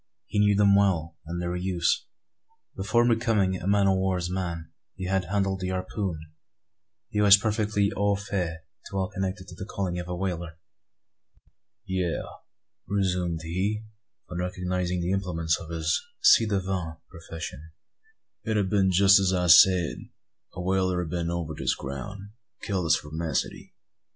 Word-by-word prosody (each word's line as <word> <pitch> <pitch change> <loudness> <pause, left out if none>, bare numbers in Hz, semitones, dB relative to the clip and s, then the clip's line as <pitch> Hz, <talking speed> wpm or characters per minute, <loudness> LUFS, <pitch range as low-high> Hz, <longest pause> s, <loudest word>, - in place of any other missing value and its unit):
He 105 - -2
knew 105 0 +4
them 100 0 +5
well, 85 -5 +2
and 85 +2 -4
their 90 0 -2
use. 90 -1 0 0.7
Before 110 +5 +2
becoming 110 -5 +2
a - - -4
man 100 0 +3
o' 95 - +4
war's 95 -2 0
man, 85 -3 -4 0.2
he 95 - -5
had 95 0 0
handled 95 +1 0
the 90 - -3
harpoon; 95 -1 -3 1.0
and 105 - +2
was 100 -1 +9
perfectly 105 -1 0
au 100 0 +2
fait 90 -5 -3 0.3
to 100 - -5
all 95 -1 0
connected 95 0 -3
with 90 - -12
the 95 - -4
calling 95 -4 -3
of 90 - -6
a 90 - -3
whaler. 85 -3 -4 1.3
"Yes," 95 -3 -1 0.6
resumed 90 -4 0
he, 95 +6 -2 0.4
on 90 -1 -5
recognising 90 0 -2
the 85 +1 -1
implements 85 -4 0
of 80 - -10
his 80 -1 0 0.2
ci 115 - +7
devant 95 -5 -2
profession, 80 -2 -8 0.7
"it 110 -1 0
ha' 100 -2 +1
been 95 -1 +2
jest 100 +2 +6
as 95 -1 +2
I 90 -1 +1
said. 85 0 +6 0.6
A 90 - -4
whaler 95 -1 +1
'a - - -3
been 85 +1 -2
over 85 -2 -3
this - - 0
ground, 70 +8 -6
and 100 +1 -12 0.3
killed 95 -4 -1
the - - -2
spermacety. 80 +1 -1
95 Hz, 155 wpm, -26 LUFS, 85-100 Hz, 1.3 s, was